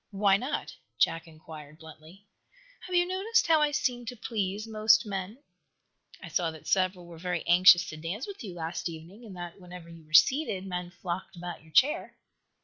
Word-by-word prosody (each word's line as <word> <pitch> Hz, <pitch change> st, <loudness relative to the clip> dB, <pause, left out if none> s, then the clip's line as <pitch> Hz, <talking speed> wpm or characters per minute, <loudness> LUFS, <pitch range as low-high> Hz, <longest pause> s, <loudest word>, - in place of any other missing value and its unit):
"Why 200 Hz, -1 st, +3 dB
not?" 255 Hz, +8 st, -3 dB, 0.2 s
Jack 165 Hz, 0 st, +1 dB
inquired, 155 Hz, -2 st, -12 dB
bluntly. 160 Hz, +4 st, -15 dB, 0.6 s
"Have 365 Hz, -, -3 dB
you 350 Hz, 0 st, +4 dB
noticed 390 Hz, +5 st, +1 dB
how 320 Hz, -2 st, +4 dB
I 300 Hz, -, +3 dB
seem 255 Hz, -5 st, -1 dB
to 245 Hz, -, -5 dB
please 210 Hz, -2 st, -3 dB
most 220 Hz, +1 st, +4 dB
men?" 205 Hz, +6 st, -5 dB, 0.8 s
"I -, -, -7 dB
saw 175 Hz, -3 st, 0 dB
that 160 Hz, -1 st, -11 dB
several 185 Hz, -2 st, 0 dB
were 170 Hz, -1 st, -12 dB
very 180 Hz, -1 st, -3 dB
anxious 180 Hz, 0 st, +7 dB
dance 165 Hz, -, -5 dB
with 400 Hz, -8 st, -9 dB
you 190 Hz, -5 st, -7 dB
last 170 Hz, +1 st, -4 dB
evening, 170 Hz, +8 st, -11 dB
and 210 Hz, -5 st, -10 dB
that, 175 Hz, +2 st, -8 dB
whenever 180 Hz, -1 st, -11 dB
you 165 Hz, -1 st, -13 dB
were 155 Hz, -, -20 dB
seated, 255 Hz, -, +4 dB
men 180 Hz, -2 st, -4 dB
flocked 175 Hz, +2 st, -6 dB
about 175 Hz, 0 st, -7 dB
your 160 Hz, 0 st, -20 dB
chair." 300 Hz, -, +2 dB
185 Hz, 180 wpm, -28 LUFS, 170-225 Hz, 0.8 s, anxious